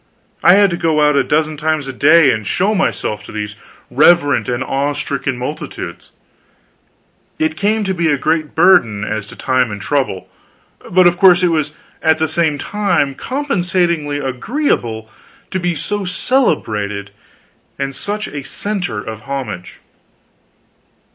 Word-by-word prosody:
I 175 - +7
had 200 -2 +4
to 170 - -2
go 160 -2 +1
out 150 - +2
a 140 - +3
dozen 155 +3 0
times 155 -2 -1
a 135 - -5
day 150 +2 +5
and 110 -3 -3
show 200 +4 +1
myself 110 - -1
to - - -10
these 105 -1 -5 0.4
reverent 145 -3 +4
and 125 +1 -1
awe 140 +2 -1
stricken 140 -2 -3
multitudes. 130 +5 -6 1.3
It 315 0 0
came 215 +2 0
to 190 -1 -1
be 170 -3 0
a 145 - +2
great 155 +2 -1
burden, 120 - +4
as 110 -1 -3
to - - -11
time 130 -2 +1
and 100 -1 -6
trouble, 130 -3 -2 0.6
but 185 0 +4
of 175 0 +4
course 185 -2 +6
it 180 - +4
was 155 -2 -1 0.3
at 160 -1 +3
the 160 0 0
same 160 -1 +1
time 200 -8 0
compensatingly 175 - -1
agreeable 130 - -2 0.4
to 185 - -1
be 175 -1 -1
so 205 +7 -2
celebrated 105 - 0 0.7
and 135 -1 -3
such 210 +5 -4
a 145 - -6
center 195 - -3
of 110 -1 -8
homage. 110 -10 -5
150 Hz, 150 wpm, -17 LUFS, 125-180 Hz, 1.3 s, I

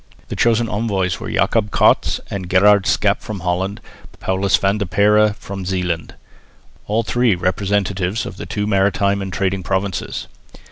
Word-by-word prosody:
The - - -4
chosen 115 0 +2
envoys 100 -4 -1
were - - -6
Jacob 105 +3 +1
Cats - - +3
and 95 -3 -5
Gerard 100 +1 +5
Schaep 100 -1 +2
from 105 -4 -7
Holland, 95 +3 -2 0.4
Paulus 95 +1 +1
van 100 +2 0
der 100 - -2
Perre 105 +3 +3
from 100 -1 -7
Zeeland, 90 -3 -3 0.7
all 110 +3 +1
three 120 -2 +2
representative 95 +2 -1
of - - -8
the - - -7
two 105 -1 -2
maritime 100 0 +1
and 95 -1 -5
trading 95 +1 -1
provinces. 95 +1 -3
100 Hz, 150 wpm, -19 LUFS, 95-105 Hz, 0.7 s, Gerard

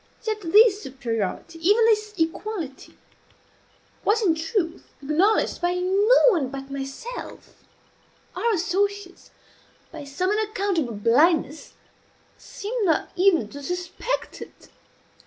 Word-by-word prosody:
Yet 435 -1 -2
this 410 +4 +5
superiority, 255 - -4
even 410 +7 +4
this 425 -1 +1
equality, 325 -3 -4 1.1
was 440 +2 +2
in 350 -5 +4
truth 325 +2 -2 0.2
acknowledged 330 +12 +1
by 350 0 +1
no 390 +6 +3
one 330 - +1
but 270 0 -8
myself; 275 - -8 0.7
our 470 - 0
associates, 390 +1 -2 0.6
by 310 -3 -9
some 325 +8 -2
unaccountable 400 - -1
blindness, 295 - +2 0.6
seemed 440 +3 -5
not 320 - 0
even 360 - +3
to 285 - -9
suspect 360 - -4
it. - - -12
360 Hz, 105 wpm, -24 LUFS, 300-420 Hz, 1.1 s, this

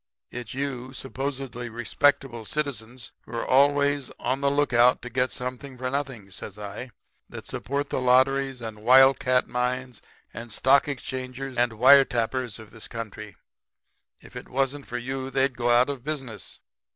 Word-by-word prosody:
It's 120 -1 -7
you 130 -2 -4
supposedly 135 -2 -5
respectable 120 +1 +1
citizens 120 -1 -4
who 110 - -12
are 115 - -2
always 140 0 +3
on 135 +2 -1
the 140 - +3
lookout 125 -4 +3
to 125 - -7
get 125 +2 +1
something 125 +1 -5
for 130 0 -3
nothing,' 135 -8 -4
says 100 +1 -8
I, 105 +5 -7 0.4
'that - - -9
support 140 +2 -3
the - - -1
lotteries 130 +1 +3
and 110 -2 -7
wild 130 +4 +7
cat 125 0 +2
mines 125 0 -2 0.3
and 115 +1 -8
stock 135 +5 +4
exchanges 130 -1 -5
and 120 -1 +2
wire 130 +5 +7
tappers 120 -1 -2
of 110 -2 -13
this 110 - -9
country. 105 -2 -7 0.8
If - - -16
it - - -8
wasn't 135 +2 -1
for 125 - -4
you 130 +2 -4
they'd 135 -1 +1
go 120 0 0
out 120 +1 +5
of 140 -4 -5
business. 135 - -6
130 Hz, 160 wpm, -26 LUFS, 120-135 Hz, 0.8 s, wild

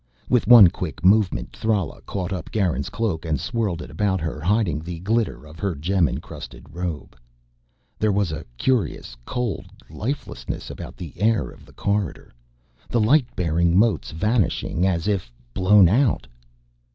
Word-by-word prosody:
With 125 -5 +2
one 115 -5 +10
quick 85 -2 -6
movement 100 0 +3
Thrala 105 -8 -1
caught 95 -1 -3
up 90 -4 -5
Garin's 90 - 0
cloak 105 -6 -2
and 80 -4 -1
swirled 100 - -2
it - - -11
about 95 +4 0
her, 80 -2 -4
hiding 95 -3 +1
the 85 +2 -6
glitter 110 -3 -1
of 80 +2 -13
her 100 -4 -1
gem 85 +4 +1
encrusted - - -8
robe. 85 -6 -5 0.8
There 110 -1 +2
was 100 -4 +1
a 80 - -5
curious 100 - -1
cold 125 -4 -3 0.2
lifelessness 120 - -5
about - - -9
the 85 -5 -8
air 110 +4 +1
of - - -17
the - - -17
corridor, 100 -10 -2 0.6
the 120 - +1
light 125 +4 +4
bearing 85 0 +2
motes 100 - +2
vanishing 95 - 0
as 90 0 0
if 95 -12 -1 0.2
blown 95 +2 +6
out. 120 - +2
95 Hz, 150 wpm, -23 LUFS, 80-110 Hz, 0.8 s, one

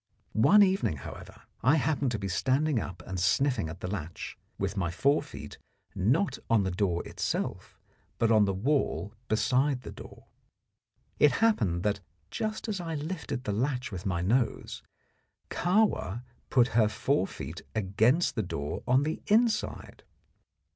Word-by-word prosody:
One 200 - +6
evening, 190 - +1
however, 65 - -10 0.2
I 130 +7 +5
happened 145 -3 +1
to - - 0
be 100 -1 -4
standing 130 +8 +1
up 90 -4 -6
and 95 -1 -4
sniffing 125 - +2
at 80 - -9
the - - -3
latch, 90 -4 -5 0.2
with - - -2
my 90 -4 0
fore 140 - +2
feet - - -10 0.3
not 125 - +1
on 115 -3 +4
the 95 - -1
door 90 -2 -1
itself, - - -3 0.4
but 115 -1 +2
on 110 -2 +6
the 100 - +1
wall 110 -1 0
beside 130 +4 +1
the - - -7
door. - - -12 0.9
It 150 - +6
happened 105 - +2
that, 105 -1 0 0.3
just 215 +1 -3
as 200 -4 -2
I 165 -2 -4
lifted 150 -4 -4
the 105 - -2
latch 125 +3 -1
with 95 0 -5
my 90 -3 0
nose, 115 +6 0 0.7
Kahwa 175 - +1 0.3
put 125 -1 +4
her 110 -1 +4
fore 120 0 0
feet 80 +6 -7
against 110 - +2
the 115 - -1
door 75 -7 -4
on 130 +3 +4
the 155 +2 -3
inside. 225 +1 +1
120 Hz, 155 wpm, -29 LUFS, 95-150 Hz, 0.9 s, One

